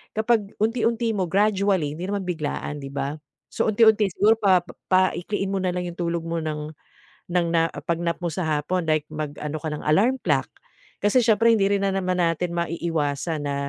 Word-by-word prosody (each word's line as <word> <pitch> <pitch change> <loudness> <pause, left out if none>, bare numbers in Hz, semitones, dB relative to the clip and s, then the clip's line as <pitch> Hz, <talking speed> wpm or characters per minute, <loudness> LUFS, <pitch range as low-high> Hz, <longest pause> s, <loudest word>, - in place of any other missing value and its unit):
kapag 220 -2 +1
unti-unti 230 +1 +1
mo, 190 -2 0
gradually, 195 -6 +2
hindi 175 +3 -5
naman 200 -1 -2
biglaan 150 -3 -3
'di 135 - -6
ba, 140 +1 -2 0.4
so - - 0
unti-unti 220 -1 +5
siguro 215 +5 +4
pa 190 -4 +4 0.3
paikliin 185 +2 +1
mo 195 - 0
na 185 -1 0
lang 180 0 -2
'yong 175 0 -8
tulog 170 -1 -1
mo 165 0 -2
ng 150 -1 -4 0.6
ng 175 -1 +2
na 165 -1 +3
pag-nap 170 0 -2
mo 170 - 0
sa 175 +2 -3
hapon 175 +4 -2
like 155 -1 +2
mag-ano 150 0 -4
ka 160 - -3
ng 150 - -5
alarm 200 +12 +3
clock, - - +1 0.5
kasi 205 +5 +4
siyempre 230 0 +4
hindi 200 -3 +3
rin 200 -1 +1
na 195 - +1
naman 185 -1 -1
natin 170 +1 0
maiiwasan 165 -2 -2
na, 140 - -1
180 Hz, 185 wpm, -24 LUFS, 160-205 Hz, 0.6 s, unti-unti